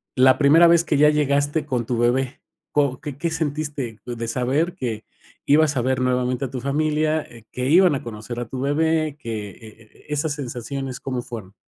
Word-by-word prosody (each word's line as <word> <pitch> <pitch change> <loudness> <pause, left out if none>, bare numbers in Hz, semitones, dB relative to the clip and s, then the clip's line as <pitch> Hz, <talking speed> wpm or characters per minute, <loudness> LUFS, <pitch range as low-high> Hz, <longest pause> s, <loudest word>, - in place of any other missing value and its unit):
La 130 0 +5
primera 155 +4 +6
vez 170 0 +5
que 155 - 0
ya 150 +1 +6
llegaste 145 0 +1
con 125 -5 -2
tu 120 +1 -2
bebé, 125 +3 0 0.3
¿co 140 -3 +1
qué 145 -2 -7
qué 165 +4 -1
sentiste 145 -7 -3
d 120 - -5
de 115 0 -4
saber 135 +9 0
que 115 - -4 0.4
ibas 150 0 +3
a 125 - +2
ver 130 +1 0
nuevamente 125 +1 0
a 130 - -5
tu 130 - -4
familia, 155 +2 +1
eh, 115 -2 -16
que 125 +1 -2
iban 175 0 +5
a 135 - -5
conocer 115 +1 -7
a 120 - -3
tu 130 - -6
bebé, 155 +1 +1
que, 110 -5 -5
eh - - -17 0.3
eh, 110 - -22
esas 150 +1 -1
sensaciones 135 -1 -5
cómo 130 -2 -3
fueron? 105 -5 -8
135 Hz, 200 wpm, -22 LUFS, 125-150 Hz, 0.4 s, primera